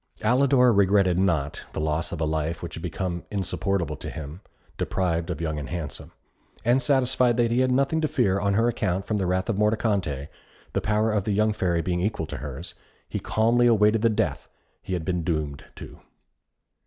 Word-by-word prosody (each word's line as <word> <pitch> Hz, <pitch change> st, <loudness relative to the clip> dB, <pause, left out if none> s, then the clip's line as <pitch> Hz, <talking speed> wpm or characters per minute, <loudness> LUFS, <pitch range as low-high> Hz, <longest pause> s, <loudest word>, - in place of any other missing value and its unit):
Alidor 125 Hz, -2 st, +4 dB
regretted 95 Hz, -2 st, +3 dB
not 80 Hz, -6 st, 0 dB
the -, -, -3 dB
loss 80 Hz, +2 st, -1 dB
of 85 Hz, -, -4 dB
a 80 Hz, -, +1 dB
life 80 Hz, +2 st, -2 dB
which 85 Hz, -, -6 dB
had 80 Hz, -, -7 dB
become 90 Hz, 0 st, -3 dB
insupportable 95 Hz, -4 st, -1 dB
to -, -, -6 dB
him, 80 Hz, +4 st, -8 dB, 0.4 s
deprived 85 Hz, -3 st, -1 dB
of 85 Hz, -4 st, -3 dB
Young 80 Hz, -2 st, -2 dB
and 70 Hz, -, -6 dB
Handsome; 85 Hz, -3 st, -5 dB, 0.5 s
and 120 Hz, +3 st, +4 dB
satisfied 125 Hz, -3 st, +2 dB
that 120 Hz, -1 st, +2 dB
he 120 Hz, -, +2 dB
had 130 Hz, 0 st, +2 dB
nothing 140 Hz, +5 st, +2 dB
to 155 Hz, -, +2 dB
fear 95 Hz, -8 st, +1 dB
on 100 Hz, 0 st, +1 dB
her 115 Hz, +3 st, +3 dB
account 95 Hz, -5 st, -1 dB
from 105 Hz, 0 st, -1 dB
the 95 Hz, -3 st, -1 dB
wrath 90 Hz, +1 st, 0 dB
of 105 Hz, -3 st, -1 dB
Mordicante, 100 Hz, -, 0 dB, 0.5 s
the -, -, 0 dB
power 105 Hz, +1 st, +1 dB
of 105 Hz, -2 st, 0 dB
the 105 Hz, -, 0 dB
young 110 Hz, +1 st, +2 dB
Fairy 85 Hz, -4 st, 0 dB
being 90 Hz, -1 st, -1 dB
equal 105 Hz, +4 st, -1 dB
to -, -, -6 dB
hers, 75 Hz, +3 st, -7 dB, 0.3 s
he -, -, -3 dB
calmly 120 Hz, +2 st, +2 dB
awaited 110 Hz, -1 st, +4 dB
the 115 Hz, -, +4 dB
death 110 Hz, -, -1 dB, 0.3 s
he 95 Hz, -, -5 dB
had 85 Hz, -3 st, -2 dB
been 90 Hz, -2 st, -1 dB
doomed 75 Hz, -4 st, -2 dB
to. -, -, -11 dB
95 Hz, 195 wpm, -25 LUFS, 85-110 Hz, 0.5 s, Alidor